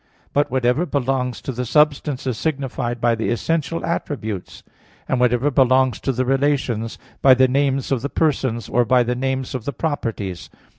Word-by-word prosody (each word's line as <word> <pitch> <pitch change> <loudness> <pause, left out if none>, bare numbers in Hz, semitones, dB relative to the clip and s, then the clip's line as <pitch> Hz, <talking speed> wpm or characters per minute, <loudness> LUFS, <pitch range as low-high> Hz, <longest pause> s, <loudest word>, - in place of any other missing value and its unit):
But 145 +1 +2
whatever 130 +6 +1
belongs 130 -3 -1
to - - -3
the 125 0 -3
substance 145 0 +1
is 130 -3 -1
signified 130 -4 -2
by 120 0 +2
the 115 -1 -2
essential 165 +6 -1
attributes; 110 - -4 0.4
and 130 - 0
whatever 125 +3 +2
belongs 130 -3 +3
to 135 - -1
the 130 0 -1
relations, 130 -4 0 0.2
by 130 -1 +7
the 130 +1 +5
names 135 0 0
of 130 -4 +1
the 140 - -3
persons, 130 -8 0
or 120 - +2
by 125 +1 +3
the 120 +1 -1
names 130 +1 -2
of 125 -4 -4
the 140 - -3
properties. 115 - -3
130 Hz, 170 wpm, -21 LUFS, 120-140 Hz, 0.4 s, by